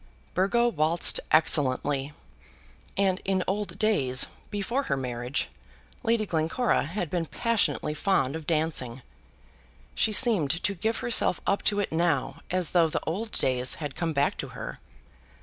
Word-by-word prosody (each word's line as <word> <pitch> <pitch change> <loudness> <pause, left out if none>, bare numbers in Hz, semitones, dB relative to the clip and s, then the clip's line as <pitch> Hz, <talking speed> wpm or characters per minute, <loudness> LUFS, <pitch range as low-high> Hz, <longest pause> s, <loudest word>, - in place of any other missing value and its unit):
Burgo 200 +6 +2
waltzed 165 -4 +3
excellently, 145 -2 +3 0.9
and 190 -1 +1
in 190 -1 0
old 195 -2 -3
days, 140 -13 +3 0.2
before 210 +6 -2
her 140 - +1
marriage, 125 0 -3 0.5
Lady 225 -1 +1
Glencora 165 - 0
had 175 +3 -4
been 170 -3 -2
passionately 230 -8 -1
fond 150 -4 0
of 160 -2 -8
dancing. 155 -6 0 0.9
She 220 - +1
seemed 210 - +4
to 200 - +1
give 220 +5 -2
herself 235 -6 +2
up 200 - 0
to 205 -1 +2
it 205 - -2
now 160 -4 -1
as 180 -3 -1
though 170 -2 +4
the 155 - -3
old 210 +7 -3
days 125 -1 +2
had 145 -4 -6
come 165 -1 -2
back 140 -1 0
to - - -4
her. - - -7
170 Hz, 145 wpm, -26 LUFS, 145-205 Hz, 0.9 s, seemed